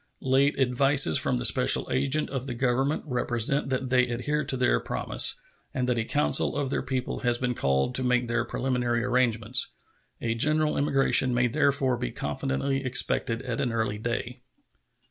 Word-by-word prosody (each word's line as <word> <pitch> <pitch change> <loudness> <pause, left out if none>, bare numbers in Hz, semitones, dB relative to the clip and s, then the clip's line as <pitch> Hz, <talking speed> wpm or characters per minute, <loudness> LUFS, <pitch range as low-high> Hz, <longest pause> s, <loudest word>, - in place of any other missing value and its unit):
Late 135 +2 +2
advices 135 - +3
from - - -1
the - - -1
special - - +4
agent 140 +3 0
of 135 -1 -4
the 125 - -5
Government 130 +4 0
represent 125 0 -1
that 130 -1 -3
they 125 -1 +3
adhere 135 +6 -2
to 135 -1 -3
their 125 - +2
promise, - - +1 0.4
and 125 -1 -1
that 125 -2 0
a 110 - -2
council 145 +5 +1
of 140 -2 -2
their - - -1
people 130 -1 -4
has 120 -1 0
been 125 0 -2
called 70 - 0
to 130 - +2
make 125 -1 +1
their 120 0 -1
preliminary 120 -2 -2
arrangements. 125 -1 +1 0.5
A 115 -1 -2
general 155 +6 +1
emigration 135 -3 +2
may 120 0 +2
therefore 140 -1 +1
be - - -4
confidently 135 - -3
expected 125 -2 0
at 120 -3 -4
an 125 - -1
early 110 -2 -2
day. 120 +2 -4
125 Hz, 170 wpm, -26 LUFS, 120-135 Hz, 0.5 s, special